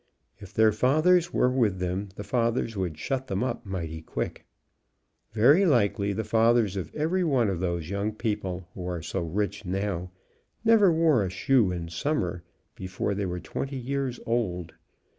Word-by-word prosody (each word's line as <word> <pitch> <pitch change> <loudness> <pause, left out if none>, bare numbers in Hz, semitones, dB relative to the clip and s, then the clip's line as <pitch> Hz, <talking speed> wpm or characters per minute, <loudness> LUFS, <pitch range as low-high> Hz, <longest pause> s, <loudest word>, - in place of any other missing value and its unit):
If 100 -3 -11
their 110 0 +4
fathers 155 - +3
were 125 - +2
with 115 -7 +1
them 90 +2 -2
the 105 - -6
fathers 115 -1 0
would 90 -5 -3
shut 130 - -3
them 95 0 -1
up 120 -4 -3
mighty 80 -4 -4
quick. - - -5 0.8
Very 125 - +5
likely 105 - +2
the 110 +3 -2
fathers 115 -2 +3
of 90 -5 -4
every 165 +5 +1
one 130 - +2
of 95 -3 -2
those 85 -2 -2
young 100 +2 -1
people, 95 -5 -3
who 90 -1 -6
are 90 -3 -4
so 95 - -3
rich 100 +5 -2
now, 95 -1 -2 0.6
never 220 -5 +6
wore 160 -8 +3
a 95 - -2
shoe 105 +2 +2
in 85 -2 -4
summer 90 - -1 0.3
before 95 +2 -3
they 100 -1 -2
were 90 0 -3
20 135 +9 -5
years 130 0 -3
old. 90 -8 -1
105 Hz, 165 wpm, -27 LUFS, 90-125 Hz, 0.8 s, never